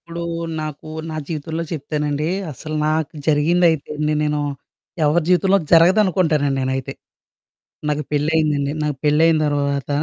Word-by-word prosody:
ఇప్పుడూ 170 0 -6 0.4
నాకు 155 0 -7 0.2
నా 155 - -5
జీవితంలో 160 +1 -4
చెప్తానండీ, 150 -1 -2 0.2
అసలు 155 +3 -6
నాకు 155 0 0 0.2
జరిగిందయితే, 160 +1 +2
నే 150 - +1
నేను 150 0 0 0.7
ఎవరి 155 +3 +2
జీవితంలో 190 +2 +4
జరగదనుకుంటానండి 165 -5 +4
నేనైతే. 130 0 -2 1.0
నాకు 150 0 0
పెళ్లయిందండి, 150 -1 +1
నాకు 150 -2 -1
పెళ్లయిన 155 +2 +4
తర్వాత 140 -1 -1
155 Hz, 115 wpm, -20 LUFS, 145-165 Hz, 1.0 s, జీవితంలో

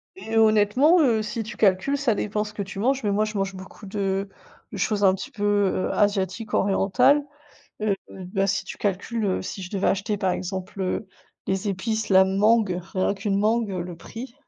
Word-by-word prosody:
Et 225 -12 -3
honnêtement, 220 - +5
heu, 230 -7 +3
si 215 +2 -3
tu 220 +3 -9
calcules, 205 +7 +2
ça 275 -5 +1
dépend 210 0 -1
ce 210 0 -9
que 210 - -4
tu 195 0 -7
manges, 265 +5 +1
mais 205 - +1
moi, 210 +2 +2
je 215 -1 -5
mange 195 0 -2
beaucoup 190 +2 -11
de 195 0 -2 0.4
de - - -6
choses 210 -3 0
un 190 -1 +6
petit 190 - -6
peu, 205 - -6
heu, 205 -2 +1
asiatiques, 205 +1 0
orientales. 200 +9 +3 0.6
Heu, 210 -2 +1
bah, 195 +1 -2
si 195 0 0
tu - - -7
calcules, 210 +3 -2
heu, 190 - 0
si 190 - -6
je 180 - -7
devais 200 -2 -1
acheter, 205 +2 0
par 190 -2 +1
exemple, 185 +1 -5
heu, 190 +3 -2 0.4
les 190 +2 -1
épices, 220 +3 -2
la 190 0 +7
mangue. 200 0 +2
Ren 190 0 +1
qu'une 200 0 -1
mangue, 220 +1 +1
heu, 185 -2 -3
le 175 -1 -8
prix 235 +8 -9
205 Hz, 205 wpm, -24 LUFS, 190-220 Hz, 0.6 s, la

